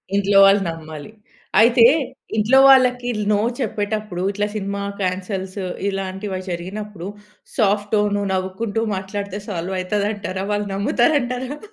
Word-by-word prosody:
ఇంట్లో 200 0 +3
వాళ్ళు 195 +1 +5
నమ్మాలి. 160 +1 -8 0.5
అయితే, 235 +2 +6 0.5
ఇంట్లో 225 +5 +4
వాళ్ళకిల్ 250 -3 +4
నో 205 - +3 0.2
చెప్పేటప్పుడు, 210 -5 -3
ఇట్లా 205 +1 -1
సినిమా 200 -1 -3 0.2
కాన్సెల్స్‌, 190 +1 -3 0.2
ఇలాంటివ 195 0 -4
జరిగినప్పుడు, 185 +2 -6 0.5
సాఫ్ట్ 205 -2 +1
టోన్ 205 -1 +1 0.2
నవ్వుకుంటూ 190 +4 -2
మాట్లాడితే 200 +1 -5
సాల్వయితదంటారా? 190 +1 -2
వాళ్ళు 205 0 -1
నమ్ముతారంటారా? 250 +5 0
205 Hz, 100 wpm, -21 LUFS, 190-215 Hz, 0.5 s, అయితే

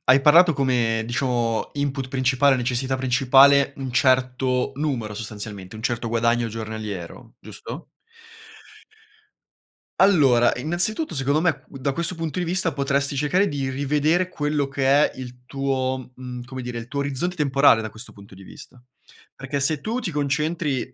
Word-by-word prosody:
hai 130 +2 +5
parlato 165 +4 +6
come, 120 -5 0
diciamo, 120 -2 -1
input 140 -2 -2
principale, 130 +1 +2
necessità 130 +2 -1
principale, 135 +2 +4
un 135 -2 -5
certo 130 -2 +1
numero, 130 -8 -3
sostanzialmente, 105 -2 -8
un 110 - -10
certo 120 -1 -2
guadagno 115 0 +1
giornaliero, 110 -5 -7
giusto? - - -9 2.2
Allora, 135 -11 +5
innanzitutto, 175 - -1
secondo 140 +3 +1
me, 175 -3 +3 0.2
q - - -12
da 140 +1 -1
questo 170 +4 -1
punto 165 -1 -4
di 180 - 0
vista 180 -2 +1
potresti 140 0 0
cercare 180 +8 +2
di 140 -2 -3
rivedere 150 +7 0
quello 150 -3 -1
che 135 -1 -2
è 140 -1 +3
il 125 -1 -9
tuo, 130 -1 -3
mhmm, 125 -1 -8
come 130 0 -7
dire, 120 -1 -5
il 115 - -8
tuo 140 +2 -3
orizzonte 140 +6 -2
temporale 140 -6 +4
da 110 - -5
questo 115 +3 -8
punto 100 -2 -15
di 95 - -14
vista. 120 +5 -14 0.5
Perché 140 +1 -4
se 140 +1 0
tu 230 +3 -2
ti 205 -8 -3
concentri, 150 -1 -1
135 Hz, 150 wpm, -23 LUFS, 120-145 Hz, 2.2 s, parlato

